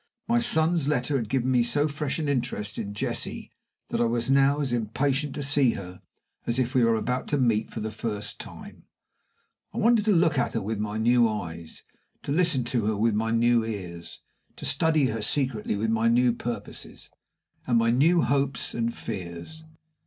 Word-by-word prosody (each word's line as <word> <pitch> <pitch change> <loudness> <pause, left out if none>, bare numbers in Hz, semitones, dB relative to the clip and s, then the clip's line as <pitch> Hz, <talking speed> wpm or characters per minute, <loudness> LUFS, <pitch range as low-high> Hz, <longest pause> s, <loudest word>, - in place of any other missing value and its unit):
My 235 +1 +3
son's 170 - +2
letter 145 -1 0
had 115 -5 -1
given 130 0 0
me 125 -2 +4
so 145 +6 +1
fresh 145 -1 -3
an 155 -2 -2
interest 115 -6 -2
in 100 0 -5
Jessie - - -4 0.4
that - - -1
I - - +4
was 120 +2 0
now 140 +1 +4
as 135 -4 -1
impatient 135 +5 -1
to 145 - -3
see 140 -3 +3
her 90 -2 -8 0.5
as 120 - +1
if 130 0 0
we 130 -3 +4
were 115 0 +4
about 125 +3 -2
to 145 - 0
meet 115 -5 +1
for 110 - -6
the 110 0 -3
first 105 -2 -4
time. - - -11 0.9
I - - -9
wanted 230 -1 +3
to 215 - +3
look 165 -6 +3
at 120 - -1
her 115 - 0
with 110 +1 -3
my 105 0 -3
new 120 +1 +4
eyes, 85 -6 -6 0.4
to - - -4
listen 165 -5 +2
to 120 -3 -1
her 110 -1 0
with 115 +1 +2
my 110 +2 0
new 115 0 +3
ears, 90 -6 -7 0.3
to - - -8
study 160 -3 +3
her 115 -3 -2
secretly 115 -2 -1
with 110 +2 -1
my 115 0 +2
new 120 +1 +4
purposes, 120 0 -7 0.6
and 120 -2 +3
my 115 0 +3
new 160 +8 +4
hopes 140 -2 0
and 115 0 -2
fears. 95 - -7
120 Hz, 190 wpm, -26 LUFS, 110-140 Hz, 0.9 s, me